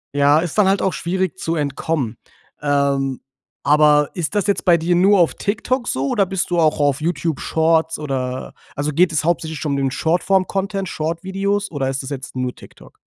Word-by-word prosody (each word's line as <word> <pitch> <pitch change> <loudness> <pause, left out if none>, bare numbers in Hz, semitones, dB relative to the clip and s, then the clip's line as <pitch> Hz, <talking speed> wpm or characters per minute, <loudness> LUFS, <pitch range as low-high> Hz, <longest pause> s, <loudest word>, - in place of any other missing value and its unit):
Ja, 145 +1 +4
ist 170 -1 -3
dann 200 - +5
halt 195 0 +2
auch 190 - +1
schwierig 185 +1 -2
zu 165 +1 -2
entkommen. 140 -4 -2 0.4
Ähm, 140 -2 0 0.4
aber 150 0 +4
ist 175 +1 -3
das 205 - +1
jetzt 200 - 0
bei 175 -2 +5
dir 170 +2 0
nur 195 +3 +5
auf 170 - +3
TikTok 240 +4 -2
so 135 +1 -1
oder 195 +4 +1
bist 185 -1 -2
du 175 - +2
auch 155 -2 +2
auf 145 0 +1
YouTube 165 -2 -1
Shorts, 160 0 +1
oder 130 -4 -4 0.2
also 145 +1 -1
geht 170 +4 +3
es 155 -1 0
hauptsächlich 160 -2 -1
schon 150 - -2
um 140 - 0
den 135 -1 +1
Short-Form-Content 190 +5 0
Short 165 +3 -3
Videos 200 +1 -1
oder 135 -4 -2
ist 135 +1 -3
das 130 - -7
jetzt 135 0 -6
nur 125 -1 -2
TikTok? - - -16
160 Hz, 195 wpm, -20 LUFS, 145-185 Hz, 0.4 s, dann